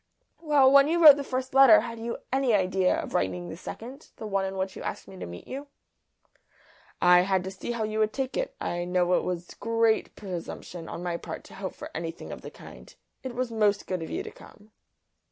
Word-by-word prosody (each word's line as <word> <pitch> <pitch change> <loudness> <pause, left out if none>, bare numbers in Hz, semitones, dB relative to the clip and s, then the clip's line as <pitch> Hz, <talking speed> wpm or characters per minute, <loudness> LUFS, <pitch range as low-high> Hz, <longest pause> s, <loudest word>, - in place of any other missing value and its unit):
"Well, 290 -5 +4
when 280 0 +7
you 335 +2 +1
wrote 305 -4 +9
the 285 - -3
first 260 -1 -4
letter 270 -6 +8
had 230 0 -7
you 230 +1 -4 0.2
any 265 -4 +3
idea 185 -1 +2
of - - -6
writing 90 -2 -1
the - - -6
second, 260 +6 -9
the 220 - -8
one 195 -2 0
in 190 0 -5
which 190 0 -3
you - - -8
asked - - -5
me 190 - -11
to - - -6
meet 85 0 -10
you?" 280 +2 -6 1.3
"I 180 0 +6
had 190 0 +1
to 190 - -5
see 190 +5 -5
how 230 -2 -2
you 215 0 -2
would 215 0 +2
take 265 +1 -3
it. - - -2
I 175 - -2
know 180 0 +1
it - - +2
was 175 -1 -4
great 230 -1 +1
presumption 175 -3 -7
on 175 - -6
my 175 -1 -2
part - - -7
to - - -15
hope 190 -1 -6
for - - -9
anything 165 0 -6
of - - -8
the - - -8
kind; - - -14 0.3
it 255 -2 -6
was 250 -1 -2
most 210 -2 +1
good 185 -2 -3
of 160 - -6
you 375 - -3
to 435 - -8
come." 210 - -17
215 Hz, 225 wpm, -27 LUFS, 180-260 Hz, 1.3 s, wrote